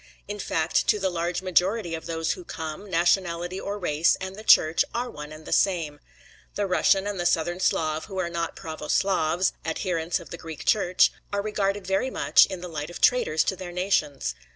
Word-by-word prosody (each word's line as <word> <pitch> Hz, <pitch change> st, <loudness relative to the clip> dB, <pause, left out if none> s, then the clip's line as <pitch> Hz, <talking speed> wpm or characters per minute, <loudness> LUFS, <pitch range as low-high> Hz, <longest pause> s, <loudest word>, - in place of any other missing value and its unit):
In 205 Hz, +1 st, -5 dB
fact 160 Hz, -4 st, 0 dB
to -, -, +4 dB
the 190 Hz, -2 st, -1 dB
large 175 Hz, +1 st, -2 dB
majority 185 Hz, +1 st, +1 dB
of 160 Hz, 0 st, -5 dB
those 165 Hz, -1 st, -1 dB
who 365 Hz, -, -5 dB
come, 160 Hz, -, -7 dB
nationality 175 Hz, +1 st, +1 dB
or 200 Hz, +1 st, -4 dB
race, 165 Hz, -4 st, +2 dB
and 190 Hz, 0 st, -6 dB
the 215 Hz, -, -10 dB
Church, 160 Hz, -6 st, +5 dB
are 245 Hz, +1 st, -2 dB
one 150 Hz, 0 st, -9 dB
and 155 Hz, 0 st, -11 dB
the -, -, -8 dB
same. 165 Hz, -7 st, +1 dB, 0.6 s
The 205 Hz, -, 0 dB
Russian 195 Hz, +1 st, +3 dB
and 205 Hz, -2 st, -3 dB
the 175 Hz, -, -2 dB
Southern 175 Hz, +1 st, 0 dB
Slav 155 Hz, -3 st, 0 dB
who 195 Hz, -2 st, -8 dB
are 185 Hz, -2 st, 0 dB
not 170 Hz, -1 st, -3 dB
pravo 155 Hz, -2 st, -7 dB
Slavs, 180 Hz, -2 st, +1 dB
adherents 165 Hz, 0 st, -1 dB
of 170 Hz, -, -13 dB
the 170 Hz, -, -7 dB
Greek 160 Hz, -2 st, -8 dB
Church, 185 Hz, -4 st, +4 dB, 0.2 s
are 200 Hz, 0 st, -1 dB
regarded 205 Hz, -2 st, -1 dB
very 195 Hz, +7 st, 0 dB
much -, -, +4 dB
in 190 Hz, -2 st, -6 dB
the 180 Hz, -, -6 dB
light 155 Hz, -2 st, -5 dB
of 175 Hz, -, -8 dB
traitors 245 Hz, -11 st, +3 dB
to 190 Hz, -, -1 dB
their 180 Hz, -1 st, -7 dB
nations. 155 Hz, -, 0 dB
175 Hz, 200 wpm, -25 LUFS, 160-195 Hz, 0.6 s, Church